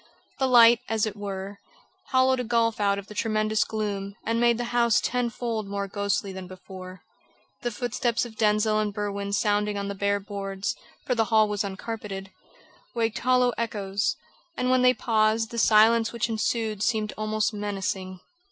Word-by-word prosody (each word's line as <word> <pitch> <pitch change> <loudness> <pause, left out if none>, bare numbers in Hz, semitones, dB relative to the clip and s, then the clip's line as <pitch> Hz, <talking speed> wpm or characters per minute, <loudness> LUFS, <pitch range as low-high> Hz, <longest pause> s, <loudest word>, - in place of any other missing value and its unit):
The 265 - +2
light, 235 -2 +7
as 220 -1 +1
it 215 -2 -4
were, 200 -1 -6 0.5
hollowed 260 0 +3
a - - -1
gulf 230 -1 +1
out 200 -1 +2
of 200 - -6
the 210 - -11
tremendous 215 0 +1
gloom 200 -2 -4
and 230 +1 0
made 235 -1 +4
the 245 - -2
house 235 -2 +4
tenfold 235 -3 -2
more 200 0 -3
ghostly 200 0 -1
than 185 -1 -7
before. 185 0 -11 0.6
The 240 - -1
footsteps 240 +1 -1
of 230 -2 -10
Denzil 215 0 +2
and 210 -1 0
Berwin 200 -1 -3
sounding 205 0 +1
on 200 0 -3
the - - -2
bare 200 +1 0
boards 195 -1 -4 0.3
for 250 - +1
the 225 -2 +2
hall 220 -1 +4
was 210 0 -1
uncarpeted 195 -1 -6 0.6
waked 230 -1 0
hollow 250 0 +3
echoes, 205 -2 -1 0.4
and 250 0 +1
when 255 0 +4
they 250 0 +5
paused 220 0 +1
the 235 - -3
silence 220 +1 +5
which 235 -1 -2
ensued 220 -1 -1
seemed 215 -1 0
almost 215 +2 -1
menacing. 195 -2 -4
215 Hz, 170 wpm, -26 LUFS, 200-230 Hz, 0.6 s, light